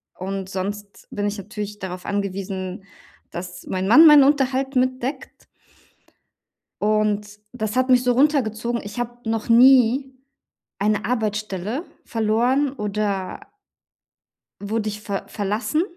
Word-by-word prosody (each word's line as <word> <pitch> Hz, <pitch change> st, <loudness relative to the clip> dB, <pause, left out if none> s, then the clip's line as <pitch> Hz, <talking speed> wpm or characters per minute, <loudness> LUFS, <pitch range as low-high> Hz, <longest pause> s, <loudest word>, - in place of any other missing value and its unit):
und 190 Hz, 0 st, -5 dB
sonst 200 Hz, +2 st, -6 dB
bin 205 Hz, 0 st, -2 dB
ich 205 Hz, +1 st, -3 dB
natürlich 210 Hz, +1 st, -6 dB
darauf 185 Hz, -1 st, -6 dB
angewiesen, 195 Hz, -1 st, -4 dB, 0.5 s
dass 180 Hz, +1 st, -8 dB
mein 185 Hz, 0 st, -2 dB
Mann 315 Hz, +9 st, +8 dB
meinen 295 Hz, -2 st, +9 dB
Unterhalt 270 Hz, -1 st, +1 dB
mitdeckt. 255 Hz, +1 st, -2 dB, 1.4 s
Und 210 Hz, 0 st, 0 dB
das 215 Hz, -2 st, -3 dB
hat 255 Hz, +1 st, +1 dB
mich 250 Hz, -1 st, +5 dB
so 250 Hz, -, +3 dB
runtergezogen. 240 Hz, -4 st, +1 dB
Ich 205 Hz, +4 st, -7 dB
habe 240 Hz, 0 st, -5 dB
noch 225 Hz, 0 st, -2 dB
nie 260 Hz, +2 st, +5 dB, 0.7 s
eine 210 Hz, 0 st, 0 dB
Arbeitsstelle 215 Hz, -, -2 dB, 0.2 s
verloren, 240 Hz, +5 st, +1 dB
oder 205 Hz, -4 st, -3 dB, 1.2 s
wurde 215 Hz, +1 st, -2 dB
ich 210 Hz, 0 st, -7 dB
ver 200 Hz, -2 st, -4 dB
verlassen. 210 Hz, -, -1 dB
215 Hz, 115 wpm, -22 LUFS, 200-250 Hz, 1.4 s, meinen